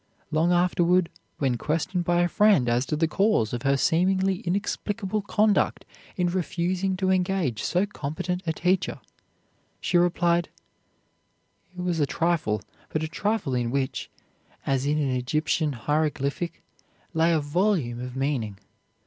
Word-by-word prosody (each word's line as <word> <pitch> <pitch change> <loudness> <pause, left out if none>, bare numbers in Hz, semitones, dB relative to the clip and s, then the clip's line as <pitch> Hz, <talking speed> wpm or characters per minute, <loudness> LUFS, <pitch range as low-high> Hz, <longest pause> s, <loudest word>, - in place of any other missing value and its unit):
Long 160 +3 +2
afterward, 175 0 +3 0.3
when 130 -4 0
questioned 170 +3 -1
by 175 0 +3
a - - +3
friend 200 - +4
as 120 +2 +1
to - - 0
the 160 +2 +2
cause 195 - +1
of 120 - -2
her 140 +1 +2
seemingly 185 +5 +2
inexplicable 205 +2 -2
conduct 210 +1 +1 0.3
in 180 - +2
refusing 185 +1 -1
to 190 0 +1
engage 180 - 0
so 180 +3 +1
competent 180 -1 -4
a - - +2
teacher, 180 +3 0 0.8
she 175 - +2
replied: 175 -1 +2 1.3
"It - - -4
was 175 -2 0
a 145 - +2
trifle, 155 - 0 0.3
but 155 - -2
a - - -1
trifle 200 -3 -1
in 120 -1 0
which, 135 0 -2 0.6
as 135 0 0
in 150 +1 +2
an 140 -3 0
Egyptian 150 +4 0
hieroglyphic, 150 +5 -1 0.5
lay 165 +1 +3
a 160 - +3
volume 150 - 0
of 125 0 -6
meaning. 130 -7 -1
170 Hz, 140 wpm, -26 LUFS, 140-185 Hz, 1.3 s, friend